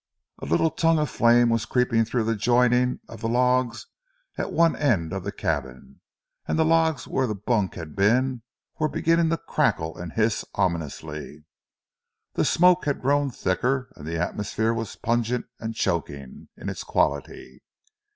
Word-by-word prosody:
A - - -5
little 155 - +2
tongue 165 0 +2
of 150 -3 -1
flame 120 0 +4
was 115 -2 0
creeping 125 -3 +2
through 115 +1 -1
the 115 +1 0
joining 125 +3 +2
of 115 -1 -11
the 115 - -1
logs 125 0 +1 0.5
at - - -3
one 165 0 +3
end 95 - 0
of 95 -2 -4
the - - -3
cabin, 65 0 -4 0.5
and - - 0
the 160 - +3
logs 160 -4 +2
where 130 -1 0
the 105 - -2
bunk 105 -1 -1
had 80 -4 -8
been 120 +5 +2 0.4
were 155 -1 +1
beginning 165 +2 +2
to 165 - +1
crackle 80 - -1
and 85 -2 -7
hiss 110 -1 +1
ominously. 80 -5 -3 0.9
The - - +1
smoke 180 +1 +4
had 145 -3 -2
grown 145 +1 +2
thicker, 125 +4 -1
and 75 -3 -10
the 85 +1 -3
atmosphere 105 +6 -1
was 115 -2 -4
pungent 120 +1 -1
and 115 0 -5
choking 70 -9 -3
in - - -8
its - - -4
quality. 70 -2 -2
115 Hz, 160 wpm, -25 LUFS, 95-130 Hz, 0.9 s, flame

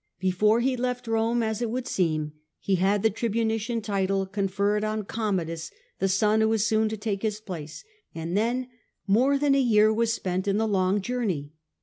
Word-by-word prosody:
Before 210 +5 +2
he 260 +1 +1
left 250 0 -2
Rome, 225 +1 +1
as 220 0 -2
it 235 - -1
would 250 +2 -3
seem, 155 -4 -1 0.3
he 195 - -1
had 195 +2 +2
the 220 - +4
tribunician 225 +1 -1
title 195 -2 0
conferred 200 +2 0
on 215 0 -1
Commodus, 180 -7 -2 0.3
the 195 - +1
son 210 +3 +3
who 220 - +3
was 220 -1 +2
soon 220 0 +2
to 220 - -4
take 205 -2 -3
his 215 -1 -2
place, 170 - -8 0.3
and 165 +2 -4
then 240 +4 0 0.4
more 250 +8 +3
than 285 0 +2
a 275 - +4
year 215 -3 +4
was 230 +1 +1
spent 185 -3 -2
in 200 0 +2
the 220 +1 +1
long 195 0 +1
journey. 195 -13 -2
215 Hz, 190 wpm, -26 LUFS, 195-225 Hz, 0.4 s, the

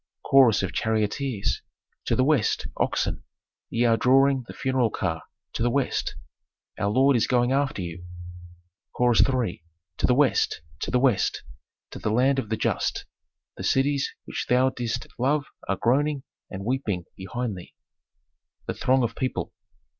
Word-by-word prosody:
Chorus 125 -7 +5
of 95 - -3
charioteers. 110 +1 -1 0.4
"To - - +1
the 130 - +3
West, 135 -6 +2
oxen, - - -1 0.5
ye 120 +1 +1
are 115 -1 +4
drawing 135 +1 +3
the - - -8
funeral 130 -3 +1
car, 85 -5 -2 0.3
to - - -4
the 120 - +3
West! 135 +1 -1 0.6
Our 105 - 0
lord 135 +5 +4
is 115 - +2
going 120 0 +2
after 135 -7 0
you." 85 +1 -7 0.9
Chorus 120 -2 +4
III. 125 -10 0 0.3
"To - - +1
the 125 - +3
West, 135 - +2 0.2
to - - -3
the 125 - +2
West, 125 -7 +1 0.5
to - - -8
the - - -2
land 130 +5 +3
of 110 - -4
the 110 - -1
just! - - -1 0.5
The - - -6
cities 140 +1 +1
which - - -4
thou 130 +1 +4
didst 120 -3 -3
love 140 +3 +1 0.2
are 100 - 0
groaning 140 +3 +1 0.3
and 95 0 -7
weeping 105 -8 -1
behind 110 +4 -4
thee." 90 - -12 0.9
_The - - -3
throng 130 0 +3
of 115 -1 -2
people. 130 - -3
125 Hz, 155 wpm, -25 LUFS, 110-135 Hz, 0.9 s, Chorus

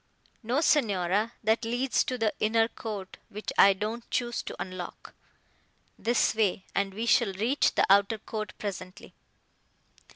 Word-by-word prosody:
"No, 250 +5 0
Signora, 210 - +2
that 220 +2 +2
leads 245 +3 +1
to 255 - -2
the 225 -3 0
inner 225 +1 +3
court, 210 -5 -7
which 210 +2 -6
I 195 - +7
don't 215 +4 -5
choose 240 -1 -1
to - - -7
unlock. 185 -1 -7 0.8
This 235 +1 +1
way, 205 -4 0
and 200 0 0
we 225 +2 -2
shall 235 -4 +3
reach 230 +9 +1
the - - +4
outer 200 +3 +4
court 215 0 -6
presently." 185 -2 -7
220 Hz, 140 wpm, -28 LUFS, 195-235 Hz, 0.8 s, I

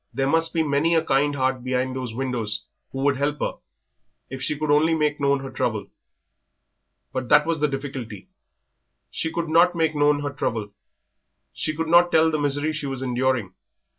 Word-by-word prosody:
There 135 - -1
must 165 +3 +2
be 165 -1 +1
many 150 +3 +2
a 160 0 +2
kind 145 +1 +2
heart 130 -2 0
behind 130 0 -1
those 130 -3 -4
windows 115 -5 -3 0.3
who 135 - -4
would 140 -1 +2
help 145 +2 -1
her - - -3 0.7
if 135 -1 -6
she 150 - -1
could 155 0 -1
only 155 +3 +4
make 150 -1 0
known 140 -1 +2
her 135 - -7
trouble. - - -2 1.2
But 130 -2 -3
that 150 0 +6
was 165 -1 -1
the 150 - +2
difficulty. 135 -7 -6 0.8
She 160 - -3
could 170 0 -2
not 170 +3 +4
make 160 -1 +1
known 145 -1 +2
her 145 - -2
trouble; 110 -6 -3 0.8
she 155 - -3
could 165 +1 -2
not 175 +1 +5
tell 160 0 +4
the 155 - -1
misery 145 +2 0
she 150 -2 -4
was 135 -1 -3
enduring. 125 -5 0
145 Hz, 185 wpm, -24 LUFS, 130-155 Hz, 1.2 s, that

